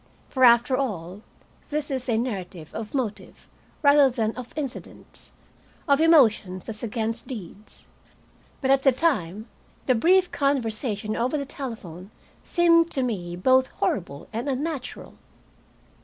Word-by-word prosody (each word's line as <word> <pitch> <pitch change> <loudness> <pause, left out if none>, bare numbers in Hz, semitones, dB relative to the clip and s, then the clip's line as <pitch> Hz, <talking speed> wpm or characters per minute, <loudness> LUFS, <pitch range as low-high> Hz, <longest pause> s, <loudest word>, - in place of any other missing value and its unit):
For, 260 - 0
after 240 +1 +6
all, 200 -8 -4 0.5
this 295 0 -3
is 260 -1 -3
a 225 - +2
narrative 185 -9 -5
of 220 +3 -6
motive 235 -6 -4 0.4
rather 285 -1 +6
than 225 -3 -1
of 250 -1 -8
incidents, 285 -5 -7 0.6
of 280 +1 +4
emotions 220 - +4
as 215 -2 -6
against 225 0 -3
deeds. 210 -4 -8 0.8
But 265 -1 +2
at 270 0 +4
the 270 - +5
time, 220 - -1 0.4
the 255 - +3
brief 360 +9 +3
conversation 225 -6 -1
over 255 +6 0
the 280 - -3
telephone 205 - -8 0.3
seemed 335 -1 +3
to 265 - 0
me 180 -8 -3
both 260 +8 +3
horrible 175 -7 -3
and 235 +6 -3
unnatural. 275 0 -4
245 Hz, 130 wpm, -25 LUFS, 210-275 Hz, 0.8 s, after